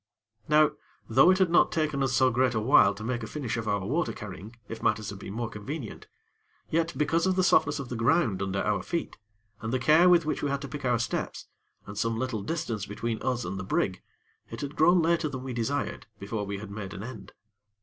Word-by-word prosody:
Now, 150 0 +5 0.4
though 135 +9 +6
it 185 - +5
had 190 -3 +2
not 175 - +5
taken 155 -3 0
us 135 -2 +1
so 130 +1 +4
great 125 +1 +2
a - - +2
while 110 -4 +5
to 105 - -8
make 120 +1 -2
a 110 - -5
finish 125 -2 -3
of 115 -2 -4
our 100 -2 0
water 155 - 0
carrying 105 +2 -9
if 115 - -7
matters 110 -2 0
had 100 - -9
been 100 - -7
more 120 0 -2
convenient; 115 +4 -7 0.6
yet 165 +1 0
because 165 +4 +1
of 185 - +2
the 185 - +2
softness 145 -4 +3
of 135 -3 -6
the 125 - -4
ground 115 - +2
under 100 0 -1
our 105 -3 0
feet, 170 - -4 0.4
and 110 0 -3
the 130 - +2
care 155 +7 +5
with 175 -2 +5
which 155 - -2
we 145 - 0
had 140 +1 -2
to - - -5
pick 140 +1 -6
our 120 -1 +3
steps, 115 - -3 0.4
and 100 0 -7
some 115 0 0
little 120 -3 -2
distance 115 - -3
between 110 +2 -3
us 125 -2 -1
and 95 - -4
the - - -4
brig, 95 0 -1 0.5
it - - -7
had 145 +1 -5
grown 175 +2 +5
later 170 -1 +2
than 130 -2 -6
we 130 -1 -5
desired, 125 +5 -2
before 105 +1 -4
we 100 0 -3
had 100 0 -8
made 100 -1 -6
an 100 - -6
end. 115 -4 -9
120 Hz, 230 wpm, -28 LUFS, 105-150 Hz, 0.6 s, though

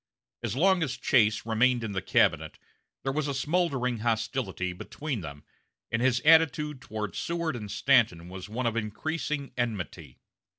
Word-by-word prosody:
As - - -3
long 190 +5 +4
as 135 -5 -1
Chase 110 -4 +3
remained 120 +2 +2
in 110 - -3
the 95 -1 -2
cabinet - - +2 0.5
there 135 - 0
was 140 -2 -1
smoldering 135 -7 0
hostility 110 -5 -1
between 130 +6 -5
them, 75 -3 -8 0.5
and 115 - 0
his 125 -1 +2
attitude 150 -2 +4
toward 105 -3 -5
Seward 170 -4 -2
and 105 -4 -6
Stanton 85 -3 +2
was 95 +2 -8
one 120 +4 -3
of 115 -1 0
increasing 140 +6 -3
enmity. 90 - -4
120 Hz, 145 wpm, -28 LUFS, 105-145 Hz, 0.5 s, long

